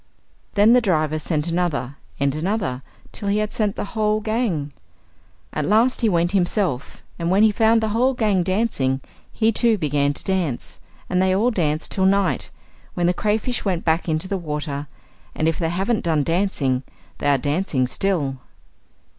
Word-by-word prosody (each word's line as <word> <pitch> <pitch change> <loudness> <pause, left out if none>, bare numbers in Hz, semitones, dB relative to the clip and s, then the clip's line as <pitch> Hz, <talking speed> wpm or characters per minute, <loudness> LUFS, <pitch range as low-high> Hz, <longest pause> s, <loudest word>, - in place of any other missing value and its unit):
Then 210 +3 +6
the 250 - +5
driver 155 -7 +1
sent 155 0 -1
another 165 -6 -1 0.2
and 140 -1 +1
another, 165 - -2 0.3
till 205 - -5
he 200 +1 +2
had 215 0 -1
sent 210 -2 0
the - - -3
whole 215 -1 +1
gang. 210 - -1 0.8
At 150 - -1
last 225 - +3
he 225 - +3
went 175 -1 +1
himself, 180 - -1 0.2
and 170 0 -1
when 195 +3 +4
he 220 - +6
found 225 +2 +3
the 220 - 0
whole 250 +5 +2
gang 210 -6 +2
dancing, 175 - 0 0.3
he 225 0 +2
too 230 0 +2
began 145 -3 +1
to - - -4
dance; 180 -10 -2 0.3
and 180 0 +1
they 185 0 +3
all 230 +6 +2
danced 155 -6 -1
till 190 -2 +1
night, 195 0 +1 0.5
when 175 - 0
the 175 - +3
cray 210 +3 +1
fish 245 +3 -3
went 185 -4 -1
back 165 +1 +1
into 155 +3 -1
the 195 0 -2
water; 150 -3 -4 0.5
and 155 - 0
if 165 - 0
they 165 -2 0
haven't 195 +6 0
done 155 -3 +2
dancing, 165 -7 0 0.4
they 145 - +1
are 140 - +4
dancing 145 -1 0
still. 145 -2 -1
180 Hz, 180 wpm, -22 LUFS, 150-210 Hz, 0.8 s, Then